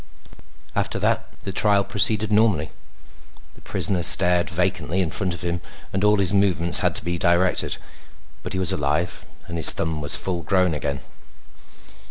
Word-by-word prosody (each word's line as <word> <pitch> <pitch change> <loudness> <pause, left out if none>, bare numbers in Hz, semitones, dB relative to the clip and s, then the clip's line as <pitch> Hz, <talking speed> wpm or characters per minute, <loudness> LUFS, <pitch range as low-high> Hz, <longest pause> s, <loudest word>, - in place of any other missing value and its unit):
After - - -2
that - - -2
the 95 - -5
trial 100 +1 +1
proceeded 105 +1 +1
normally. 105 -8 +1 0.8
The - - -19
prisoner 95 -4 -1
stared 90 0 +3
vacantly 90 0 -2
in 85 -4 -1
front 90 -4 -2
of 90 - -7
him 85 0 -3 0.3
and 95 +1 -2
all 105 0 +3
his 100 -1 0
movements 95 -4 +4
had - - -1
to - - +3
be 85 0 -3
directed. 85 +1 +1 0.6
But - - -8
he - - -4
was 95 -3 0
alive 75 +4 -3 0.2
and 85 - -6
his 80 - +9
thumb 80 -2 -1
was 75 - +2
full 90 -2 -4
grown 90 +1 0
again. 70 -2 -5
90 Hz, 165 wpm, -21 LUFS, 85-95 Hz, 0.8 s, his